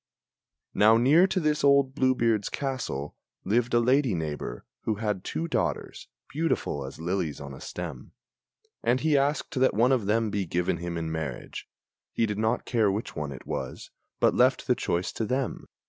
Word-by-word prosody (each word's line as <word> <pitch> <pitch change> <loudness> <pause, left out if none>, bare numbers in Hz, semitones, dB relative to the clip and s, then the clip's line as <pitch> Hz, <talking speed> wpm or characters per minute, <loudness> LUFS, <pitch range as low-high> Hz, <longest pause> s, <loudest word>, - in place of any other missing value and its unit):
Now 110 +2 +6
near 150 +10 +5
to 190 - 0
this 150 -2 0
old 140 -1 +4
Blue 130 -1 +2
beard's 115 -4 +1
castle 130 - -3 0.3
lived 120 +4 +1
a - - +6
lady 125 -2 +3
neighbor, 75 -6 -4 0.2
Who 110 - +1
had 105 -3 -2
two 165 - -3
daughters, 85 - -2 0.2
beautiful 140 - -1
as 65 - -9
lilies 85 -2 -2
on 70 -1 -8
a 65 - -11
stem; - - -7 0.7
And 120 +2 +1
he 155 -1 +2
asked 140 +1 0
that 130 -4 +3
one 120 +4 +4
of 120 -7 +1
them 110 0 +1
be 100 -3 -1
given 85 +1 0
him 85 0 -4
in 80 -1 -3
marriage 80 -6 -5 0.4
He 115 - +2
did 105 -1 -3
not 110 +2 0
care 110 -5 +2
which 105 +4 -4
one 75 -2 -3
it 65 - -9
was, 65 -2 -5 0.3
but - - +4
left - - +3
the - - +3
choice 85 +1 -1
to - - -3
them. 130 +3 -2
110 Hz, 180 wpm, -27 LUFS, 85-130 Hz, 0.7 s, Now